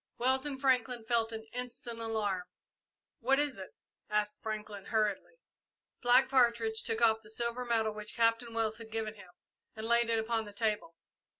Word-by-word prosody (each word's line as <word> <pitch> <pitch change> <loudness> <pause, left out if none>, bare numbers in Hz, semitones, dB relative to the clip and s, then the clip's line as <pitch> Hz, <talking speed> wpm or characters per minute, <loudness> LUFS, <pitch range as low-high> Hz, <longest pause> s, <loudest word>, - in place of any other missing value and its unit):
Wells 260 +3 +2
and 275 -2 -4
Franklin 250 -3 +2
felt 230 -1 +1
an 220 0 -6
instant 245 -1 -6
alarm. 210 -5 -1 0.7
"What 265 +3 +3
is 285 -7 0
it?" 190 - -9 0.3
asked 210 0 0
Franklin, 210 -2 -5
hurriedly. 215 - 0 0.7
Black 245 +2 +6
Partridge 235 -4 +3
took 225 0 -1
off 220 -1 +4
the 215 - -11
silver 235 +2 -1
medal 225 -2 +1
which 210 0 -5
Captain 230 0 +2
Wells 220 -1 0
had 225 -1 -9
given 220 -1 -3
to 215 - -18
him 185 - -12 0.5
and 220 0 -5
laid 235 0 +3
it 225 -1 +1
on 225 -2 0
the 205 - -10
table. 210 -5 -1
225 Hz, 175 wpm, -32 LUFS, 215-240 Hz, 0.7 s, Black